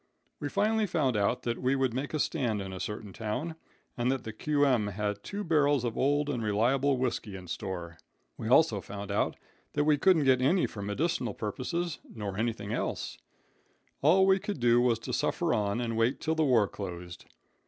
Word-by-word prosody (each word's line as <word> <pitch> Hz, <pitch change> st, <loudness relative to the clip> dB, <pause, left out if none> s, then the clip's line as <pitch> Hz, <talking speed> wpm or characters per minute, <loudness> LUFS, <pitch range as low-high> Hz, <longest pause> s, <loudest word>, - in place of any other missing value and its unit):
"We 145 Hz, -, -3 dB
finally 215 Hz, +4 st, +1 dB
found 150 Hz, -9 st, +1 dB
out 105 Hz, +4 st, +1 dB
that 120 Hz, 0 st, -2 dB
we 130 Hz, +2 st, +2 dB
would 130 Hz, -3 st, +1 dB
make 140 Hz, +5 st, -3 dB
a -, -, -1 dB
stand 115 Hz, -7 st, 0 dB
in 95 Hz, -1 st, -5 dB
a 95 Hz, -, -6 dB
certain 105 Hz, -1 st, -5 dB
town, 120 Hz, -, -3 dB, 0.4 s
and 120 Hz, 0 st, +1 dB
that 135 Hz, -2 st, -2 dB
the 110 Hz, -, -6 dB
Q.M. 140 Hz, -4 st, +2 dB
had 105 Hz, 0 st, -3 dB
two 205 Hz, +1 st, -4 dB
barrels 145 Hz, -, +3 dB
of 120 Hz, -2 st, -2 dB
old 145 Hz, +2 st, +2 dB
and 130 Hz, -5 st, -2 dB
reliable 125 Hz, +6 st, +2 dB
whisky 120 Hz, -5 st, -2 dB
in 95 Hz, -1 st, -9 dB
store. 85 Hz, -1 st, -5 dB, 0.4 s
We -, -, -5 dB
also -, -, +4 dB
found 100 Hz, 0 st, -7 dB
out 100 Hz, -, 0 dB, 0.4 s
that 145 Hz, -, +2 dB
we 150 Hz, -1 st, +3 dB
couldn't 180 Hz, -4 st, +4 dB
get 130 Hz, -2 st, +4 dB
any 170 Hz, +8 st, +3 dB
for 100 Hz, -, -6 dB
medical 120 Hz, +5 st, -1 dB
purposes 165 Hz, -, -3 dB, 0.2 s
nor 105 Hz, -3 st, -4 dB
anything 110 Hz, -1 st, -2 dB
else -, -, -3 dB, 0.8 s
All 180 Hz, +7 st, +5 dB
we 190 Hz, 0 st, +4 dB
could 200 Hz, -5 st, -4 dB
do 120 Hz, 0 st, +4 dB
was 120 Hz, -2 st, +3 dB
to 115 Hz, -, -6 dB
suffer -, -, 0 dB
on 100 Hz, +1 st, 0 dB
and 115 Hz, -2 st, -2 dB
wait 115 Hz, +4 st, +1 dB
till 160 Hz, -, 0 dB
the 160 Hz, 0 st, +1 dB
war 120 Hz, -7 st, +4 dB
closed. 90 Hz, -4 st, -7 dB
120 Hz, 195 wpm, -30 LUFS, 105-145 Hz, 0.8 s, All